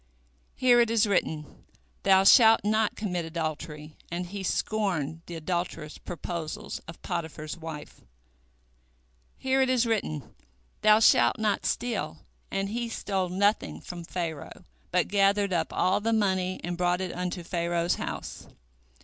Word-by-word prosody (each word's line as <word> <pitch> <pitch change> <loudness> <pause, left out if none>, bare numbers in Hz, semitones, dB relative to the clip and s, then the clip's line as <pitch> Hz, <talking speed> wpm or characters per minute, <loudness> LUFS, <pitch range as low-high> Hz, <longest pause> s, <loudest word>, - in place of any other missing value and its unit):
Here 245 -1 +5
it 235 - +2
is 225 -1 +3
written, 160 -7 -2 0.4
Thou 190 0 +5
shalt 225 +2 +7
not 215 +1 +1
commit 180 -5 -2
adultery, 155 -2 -5
and 175 +1 -3
he 195 +3 -6
scorned 175 -6 -1
the 175 - -6
adulterous 165 -2 -3
proposals 170 -2 -5
of 165 - -9
Potiphar's 160 -4 -4
wife. 160 -3 -9 1.4
Here 265 0 +1
it 260 - +2
is 250 -2 +3
written, 200 - -2 0.5
Thou 215 +1 +6
shalt 120 - +5
not 215 -2 0
steal, 230 - -2 0.3
and 195 0 -2
he 235 +2 -3
stole 190 -4 -2
nothing 200 +4 +1
from 175 -1 -8
Pharaoh, 165 -4 -5 0.2
but - - +2
gathered 200 0 +2
up 165 -2 0
all 185 +2 +2
the 225 +2 0
money 190 -4 +1
and 175 +1 -3
brought 180 0 +2
it 185 -2 -3
unto 180 0 -3
Pharaoh's 170 0 0
house. - - -6
180 Hz, 140 wpm, -28 LUFS, 165-210 Hz, 1.4 s, shalt